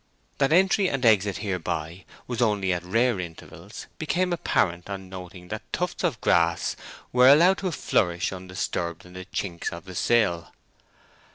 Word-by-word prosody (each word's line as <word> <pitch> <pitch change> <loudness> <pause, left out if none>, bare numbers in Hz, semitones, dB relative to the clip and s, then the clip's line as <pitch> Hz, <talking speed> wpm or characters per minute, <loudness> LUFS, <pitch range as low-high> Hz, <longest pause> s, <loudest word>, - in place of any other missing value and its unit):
That 135 +1 +2
entry 190 +2 +4
and 135 -2 -2
exit 105 -3 +4
hereby 90 -2 -3 0.2
was 125 -1 -3
only 100 -5 +2
at 90 -1 -3
rare 115 +3 +1
intervals 85 -2 -9
became 180 +3 0
apparent 90 - 0
on 95 -1 -6
noting 90 -1 -10
that - - -4
tufts - - -3
of - - 0
grass 85 0 +2 0.4
were 125 +1 +7
allowed 175 +7 +6
to 190 -2 -2
flourish 90 - 0
undisturbed 90 -2 -4
in 90 - -14
the 95 0 -8
chinks 85 -3 -4
of 85 +2 -9
the 95 - -9
sill. 95 -4 +1
95 Hz, 155 wpm, -25 LUFS, 90-125 Hz, 0.4 s, were